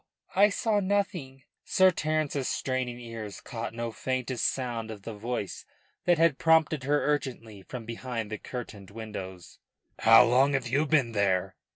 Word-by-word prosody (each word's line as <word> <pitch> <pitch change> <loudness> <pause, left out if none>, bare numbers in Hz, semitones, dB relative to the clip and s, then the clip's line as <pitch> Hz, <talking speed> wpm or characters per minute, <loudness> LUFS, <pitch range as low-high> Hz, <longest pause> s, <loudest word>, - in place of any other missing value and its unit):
I 205 +2 +6
saw 210 +1 +1
nothing." 185 -9 -1 0.2
Sir 190 0 +4
Terence's 155 -4 -1
straining 130 -2 -2
ears 115 -4 -7
caught 115 -2 -6
no 115 0 -3
faintest 130 0 -1
sound 120 -4 -3
of 105 -3 -8
the 115 - -6
voice 110 -1 -4 0.4
that 175 -1 +4
had 165 -4 +3
prompted 160 -3 +3
her 145 +1 +2
urgently 125 -8 -2
from 120 +3 -8
behind 115 -1 -5
the 110 - -4
curtained 105 -6 -7
windows. 95 -5 -8 0.4
"How 115 +2 +8
long 130 +4 +4
have 135 -3 0
you 140 +6 +1
been 140 -6 +3
there?" 95 -3 +1
125 Hz, 155 wpm, -28 LUFS, 110-145 Hz, 0.4 s, How